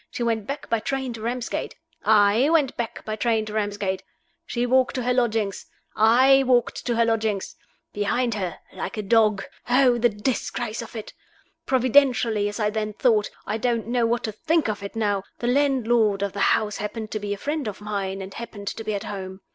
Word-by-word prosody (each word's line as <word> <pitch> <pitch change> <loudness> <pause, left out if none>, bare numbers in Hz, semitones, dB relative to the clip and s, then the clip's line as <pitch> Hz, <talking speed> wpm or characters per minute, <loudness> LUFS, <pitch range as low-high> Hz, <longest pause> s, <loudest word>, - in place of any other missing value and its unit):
She 240 - -4
went 225 -3 -1
back 280 +1 -5
by 230 - +1
train 265 +2 -3
to 225 - -8
Ramsgate. 240 +2 -3 0.3
I 215 +5 +4
went 310 -5 +2
back 235 -1 -5
by 215 - -2
train 220 0 +1
to 210 - -7
Ramsgate. 205 -3 -1 0.5
She 240 0 -1
walked 260 +2 +2
to 255 - -1
her 250 +1 +1
lodgings. 225 -5 0 0.3
I 255 +5 +6
walked 250 -2 +1
to 240 - +1
her 230 0 +3
lodgings. 220 -3 -1 0.4
Behind 230 +4 0
her. 185 -4 -3 0.2
Like - - -5
a 215 - -2
dog. 215 -1 +3 0.3
Oh, 250 -1 +4
the 240 +1 +4
disgrace 230 +1 -3
of 230 +1 -10
it! 220 - -7 0.5
Providentially, 250 -5 +3
as 205 - -7
I 210 -1 +1
then 215 0 -2
thought 215 -2 +2 0.2
I 220 - -2
don't 235 -1 0
know 235 0 +1
what 235 +1 0
to 220 - -2
think 310 +8 +1
of 210 -1 -3
it 200 +3 -7
now 205 -3 0 0.2
the - - -5
landlord 240 -6 +2
of 200 - -2
the 200 - -5 0.2
house 210 -2 -3
happened 215 +1 -5
to 215 - -2
be 205 0 -3
a - - -13
friend 290 +3 -3
of 205 - -5
mine, 200 -2 -3
and 190 +1 -9
happened 205 -4 -6
to 225 - -6
be 215 -1 -2
at 200 - -4
home. 190 -1 -6
225 Hz, 205 wpm, -24 LUFS, 210-245 Hz, 0.5 s, I